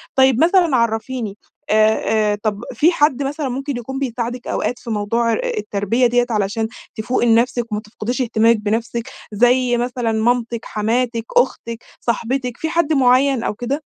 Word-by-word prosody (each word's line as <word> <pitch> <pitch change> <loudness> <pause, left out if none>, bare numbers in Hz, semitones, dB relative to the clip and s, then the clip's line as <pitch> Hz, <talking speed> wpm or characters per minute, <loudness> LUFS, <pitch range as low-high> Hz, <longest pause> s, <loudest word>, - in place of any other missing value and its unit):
طيّب 265 +1 +4
مثلًا 345 -4 +4
عرّفيني 225 -1 -2 0.3
آآ 215 0 +2
آآ، - - +1
طب 210 -2 -1
في 315 +9 +4
حد 290 -4 +2
مثلًا 280 0 -3
ممكن 270 +1 -3
يكون 265 +3 -5
بيساعدِك 245 -1 -4
أوقات 245 - -2
في - - -9
موضوع 230 +2 0
آآ، - - -1 0.2
التربية 230 - +1
ديّة 245 +1 +2
علشان 215 +1 -1 0.3
تفوقي 240 +3 0
لنفسِك، 235 0 +2
وما 210 0 -2
تفقديش 240 +4 -4
اهتمامِك 230 -1 +3
بنفسِك؟ 225 +2 -2 0.2
زي 245 +3 +3
مثلًا 245 -1 -1
مامتِك، 235 +1 0
حماتِك، 230 +2 -1
أختِك، 235 -2 0 0.2
صاحبتِك، 245 +1 -2
في 320 - -3
حد 325 -2 +1
معيّن 260 -1 +3
أو - - -1
كده؟ 255 +7 -3
240 Hz, 155 wpm, -19 LUFS, 220-260 Hz, 0.3 s, طيّب